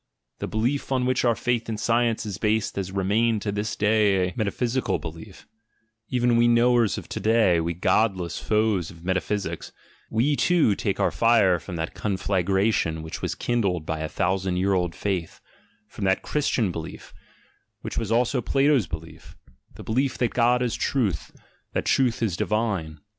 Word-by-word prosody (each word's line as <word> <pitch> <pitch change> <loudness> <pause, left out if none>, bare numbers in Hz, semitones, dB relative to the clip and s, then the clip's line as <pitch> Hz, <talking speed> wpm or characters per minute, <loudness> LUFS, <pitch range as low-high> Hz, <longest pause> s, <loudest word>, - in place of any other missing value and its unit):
The - - -3
belief 125 +6 -1
on 130 -1 +1
which 130 0 +1
our 120 -2 +3
faith 120 -1 -1
in 110 - -2
science 115 +1 +1
is 100 -3 -5
based 110 0 0
has 95 -1 -3
remained 105 +3 +1
to 105 - -1
this 105 +1 -3
day 105 -3 +2
a - - -10
metaphysical 120 +3 -1
belief 80 0 -10 0.3
— 110 0 -48
even 120 -1 +2
we 120 0 +4
knowers 120 -2 +3
of - - -7
to - - -4
day, 110 -6 +3
we 85 +1 -2
godless 90 -2 +1
foes 105 -6 +1
of 85 0 -14
metaphysics, 95 +2 -2 0.4
we, 130 +7 +1
too, 165 -9 +3
take - - -2
our - - +2
fire 110 -7 +3
from 90 +2 -8
that 80 0 -3
conflagration 95 -4 0
which 80 - -7
was - - -2
kindled 100 -9 -1
by 80 0 -3
a 80 0 -3
thousand 95 -1 -1
year 95 +2 +1
old 90 -2 0
faith, 95 -5 -3 0.5
from 105 - -8
that 95 0 +1
Christian 130 -9 0
belief, 80 -1 -8 0.7
which - - -4
was 115 -2 -4
also 120 +2 +2
Plato's 135 - +2
belief, 80 0 -9 0.4
the - - -10
belief 130 +4 0
that 120 - 0
God 125 +1 +3
is 120 - -1
truth, 115 -10 -1 0.4
that - - -1
truth 125 -3 +2
is 100 -6 0
divine. 100 -7 -1
105 Hz, 170 wpm, -25 LUFS, 95-120 Hz, 0.7 s, we